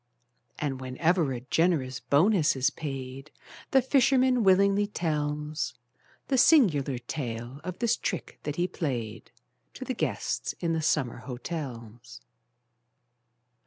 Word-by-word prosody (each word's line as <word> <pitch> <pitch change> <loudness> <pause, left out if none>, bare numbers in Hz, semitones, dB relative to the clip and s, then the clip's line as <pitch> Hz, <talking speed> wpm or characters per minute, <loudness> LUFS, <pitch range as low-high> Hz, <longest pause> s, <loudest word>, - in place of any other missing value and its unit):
And, 135 -3 -3
whenever 155 +4 +1
a 125 -2 -4
generous 135 -3 +1
bonus 165 +1 +3
is 130 0 +1
paid, 135 -1 -6 0.4
The 265 -2 +4
fisherman 260 -1 +3
willingly 200 +1 +4
tells 150 - -2 0.5
The 265 -2 +2
singular 160 - +4
tale 120 0 -5
of 185 0 -5
this 235 -1 +1
trick 180 - -4
that 150 0 -4
he 175 +2 0
played, 120 -12 -4 0.5
To - - -7
the - - -2
guests - - -2
in 165 -1 0
the 160 - 0
summer 150 -5 0
hotels. 120 -2 -7
150 Hz, 120 wpm, -28 LUFS, 130-185 Hz, 0.5 s, The